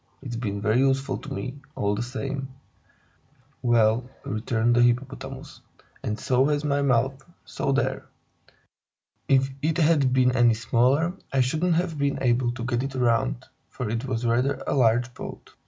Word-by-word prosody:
It's 125 -4 -5
been 100 -4 -3
very 110 +2 +2
useful 135 0 +1
to - - -10
me, 125 +8 -5 0.2
all 100 0 0
the 105 - -2
same." 135 +2 -4 1.1
"Well," 120 +1 +2 0.2
returned 115 +2 0
the 120 - +4
Hippopotamus, 135 +3 -1 0.4
"and 105 0 -3
so 130 +1 +2
has 150 0 0
my 140 -1 +1
mouth, 135 0 +1 0.2
so 140 - -2
there! 140 +1 -1 1.2
If 135 0 +3
it 155 +2 0
had 150 -5 +3
been 125 -1 +4
any 120 -2 +4
smaller, 130 +9 +2 0.2
I 135 - +2
shouldn't 160 +7 +1
have 165 -3 -1
been 140 0 0
able 120 -1 +2
to 120 -1 -5
get 120 -1 0
it 135 0 -4
round, 115 - +1 0.2
for 115 -4 -4
it 115 +2 -2
was 120 -2 -2
rather 125 +4 +1
a - - -1
large 120 -1 +2
boat." - - -9
125 Hz, 160 wpm, -25 LUFS, 120-135 Hz, 1.2 s, the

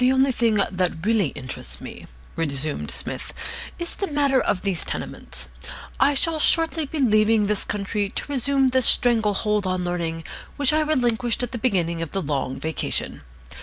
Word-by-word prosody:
"The 250 +1 +5
only 265 +1 +3
thing 230 -3 +2
that 185 -4 0
really 215 -5 +3
interests 130 -1 -5
me," - - -10 0.3
resumed 150 -2 -1
Psmith, - - -3 0.4
"is 345 -1 -2
the 395 - -3
matter 285 -4 +2
of 185 - -1
these 195 -5 +1
tenements. - - -6 0.5
I 280 +2 +4
shall 320 +3 +1
shortly 325 -1 +2
be 315 - -5
leaving 215 -4 +4
this 210 0 +1
country 205 0 -2
to 270 - -5
resume 275 0 +2
the 260 0 +2
strangle 225 -4 +4
hold 210 -1 0
on 185 -1 -1
Learning 170 -2 -2 0.3
which 285 -1 +3
I 310 - +4
relinquished 245 -6 +1
at 245 - -3
the 240 - -4
beginning 175 -8 0
of 165 - -5
the 195 - -1
Long 140 -3 -2
Vacation. 160 0 -2
215 Hz, 170 wpm, -23 LUFS, 180-265 Hz, 0.5 s, The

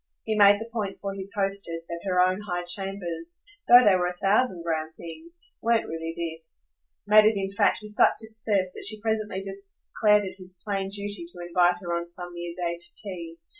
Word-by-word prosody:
He 220 - -1
made 205 -1 +6
the 225 - -6
point 205 -4 -3
for 195 -1 -4
his 195 0 -6
hostess 195 -4 -1
that 170 0 -6
her 180 -1 +1
own 185 +2 +3
high 175 -4 -3
chambers, 175 -2 -3 0.2
though 245 +1 +9
they 200 -2 +6
were 180 -1 +1
a 180 0 -5
thousand 195 -2 +1
grand 160 -1 -3
things, 325 - -11 0.2
weren't 230 0 +2
really 165 0 -5
this; 165 -1 -6 0.4
made 210 +1 +7
it 215 -1 +3
in 195 0 -2
fact 200 +3 +2
with 210 - -7
such 210 - +4
success 220 -4 0
that - - -4
she 215 +1 +2
presently 215 -3 -2
declared 200 +1 0
it 190 - -7
his 185 0 -9
plain 195 -2 -2
duty 200 -2 -2
to 175 0 -6
invite 175 0 +3
her 175 -2 -3
on 170 0 -3
some 175 0 -7
near 175 0 -6
day 170 -1 -2
to 175 0 +1
tea. 170 -5 -7
195 Hz, 205 wpm, -26 LUFS, 175-205 Hz, 0.4 s, though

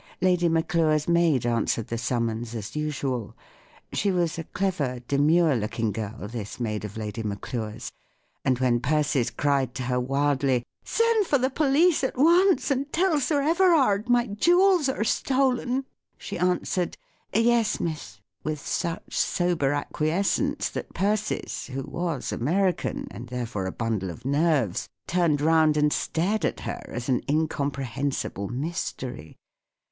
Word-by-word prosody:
Lady 180 -2 +3
Maclure's 160 -2 +1
maid 170 -7 +3
answered 115 -1 0
the 115 - -2
summons, 115 -1 -2
as 110 +3 -6
usual. 135 -6 -3 0.6
She 200 - +1
was 175 -2 0
a 165 - -5
clever, 175 -10 -1
demure 155 +2 +3
looking 110 0 -1
girl, 105 0 -5
this 110 -1 -6
maid 105 -4 -2
of 105 0 -7
Lady 110 +1 -4
Maclure's; 105 +1 -5 0.5
and 130 -2 +2
when 125 -2 +2
Persis 140 -2 +1
cried 135 -3 0
to 130 - -3
her 125 0 0
wildly, 135 -1 +1
" - - -63
Send 460 -3 +2
for 285 - +3
the 260 +1 0
police 300 +3 +3
at 260 - -1
once, 345 +4 +4
and 275 +2 -1
tell 345 -3 +2
Sir 285 +1 +1
Everard 300 - +3
my 245 -1 +4
jewels 345 - +3
are 240 -5 -1
stolen! 260 +1 +1 0.2
" - - -62
she - - -6
answered 180 0 0 0.2
" - - -44
Yes, 230 -1 +3
miss," 150 - -4 0.2
with 155 -1 -2
such 170 +4 -3
sober 175 -6 +1
acquiescence 155 +6 0
that - - -7
Persis, 210 +2 -1
who 135 0 -4
was 170 -5 -3
American, 180 +9 0
and 120 - -8
therefore 115 -6 -3
a - - -3
bundle 110 -5 -2
of 115 +8 -9
nerves, 140 - +1 0.2
turned 170 -5 +1
round 155 -1 +4
and 150 0 +3
stared 195 +7 0
at - - -1
her - - -4
as 120 +1 -5
an 130 -3 +1
incompre¬ 145 -2 0
hensible 125 -5 -3
mystery. 130 - -5
155 Hz, 150 wpm, -26 LUFS, 125-200 Hz, 0.6 s, once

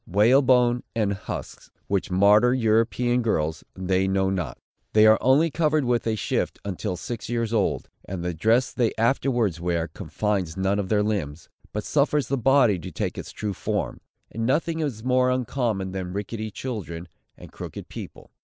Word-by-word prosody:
Whalebone 125 +4 +4
and 105 -3 +1
husks, 95 - -7 0.2
which 100 0 -1
martyr 105 +6 +5
European 120 +1 +2
girls, 80 -9 -1
they 95 +1 0
know 95 0 +1
not. 85 -9 -3 0.4
They 110 0 +6
are 110 0 +6
only 145 +5 +4
covered 155 -2 +1
with 120 -1 0
a 110 - +1
shift 105 - -1
until 95 -1 -3
six 120 +2 -6
years 115 -1 -1
old: 105 -4 0 0.2
and 90 -2 -5
the 90 0 -2
dress 115 +10 +2
they 120 -3 +1
afterwards 115 -6 +1
wear 85 -1 0
confines 95 +1 -2
none 95 +2 +1
of 95 -2 -3
their 105 -1 +3
limbs, 85 -8 -3 0.2
but 105 - -3
suffers 145 0 +1
the 140 - +1
body 125 -6 +4
to - - -8
take - - -3
its - - -7
true 105 -2 -4
form; - - -3 0.3
and 115 - -4
nothing 160 +6 +1
is 135 -9 -3
more 125 0 +3
uncommon 120 -6 -1
than 95 -1 -5
ricketty 110 +2 -4
children, 100 -8 -6 0.3
and - - -12
crooked - - -8
people. - - -10
110 Hz, 170 wpm, -25 LUFS, 95-125 Hz, 0.4 s, They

